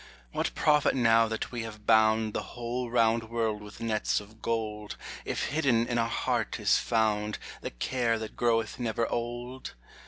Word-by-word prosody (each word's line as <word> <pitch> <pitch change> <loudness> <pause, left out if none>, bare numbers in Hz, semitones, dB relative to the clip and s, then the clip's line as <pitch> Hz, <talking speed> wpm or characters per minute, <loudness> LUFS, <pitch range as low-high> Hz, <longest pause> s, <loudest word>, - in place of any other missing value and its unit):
What - - -2
profit 150 -2 +3
now 115 -2 +5
that 110 0 -3
we 120 -2 -3
have 110 -2 -8
bound 110 -1 +4
The - - -1 0.2
whole 120 +1 -3
round 115 -1 +2
world 110 -2 -1
with 105 0 -11
nets 110 -2 0
of 110 +2 -14
gold, 105 -2 -3 0.3
If - - -2
hidden 135 -6 +2
in 120 0 0
our 115 0 +1
heart - - -1
is - - +4
found 105 -2 +1 0.2
The - - -3
care 115 - 0
that 110 -1 -6
groweth 115 -1 +1
never 115 -1 0
old? 120 - -4
115 Hz, 165 wpm, -29 LUFS, 110-120 Hz, 0.3 s, now